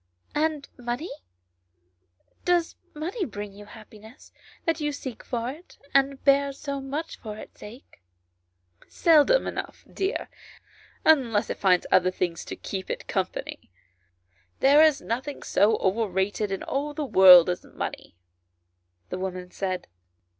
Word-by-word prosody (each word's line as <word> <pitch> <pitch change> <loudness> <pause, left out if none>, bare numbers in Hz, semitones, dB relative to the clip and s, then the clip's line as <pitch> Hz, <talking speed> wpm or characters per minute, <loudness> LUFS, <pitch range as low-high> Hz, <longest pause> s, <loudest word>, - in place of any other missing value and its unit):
" - - -37
And 300 -3 -8
money? 245 +7 -4 1.3
Does 350 -2 +1 0.2
money 355 +8 -3
bring 205 - -6
you 205 +1 -12
happi 215 -1 -14
ness 220 +3 -16 0.3
that 330 -1 +1
you 295 0 0
seek 260 -4 -7
for 240 0 -3
it, 320 +6 -15 0.2
and 275 0 +2
bear 280 0 +4
so 280 0 -5
much 290 +5 -5
for 215 -2 -7
its - - -12
sake 230 +6 -13 0.3
?" 90 0 -50
" 90 0 -27
Seldom 335 +9 +4
enough, - - -6
dear, 390 +3 -3 0.8
unless 245 -9 +3
it - - -5
finds 185 -3 +3
other 185 0 +5
things 175 -2 -3
to - - -6
keep 190 -1 -6
it - - -4
company. - - -4 0.9
There 285 +3 +6
is 310 -3 +4
nothing 265 +5 -4
so 210 +2 +3
overrated 195 0 0
in 195 - -3
all 290 +2 -3
the 300 -1 -2
world 185 -7 +8
as 180 0 -2
money," - - -7 0.9
the 185 - -4
woman 185 -1 -5
said. 185 -2 -3
240 Hz, 145 wpm, -26 LUFS, 190-290 Hz, 1.3 s, world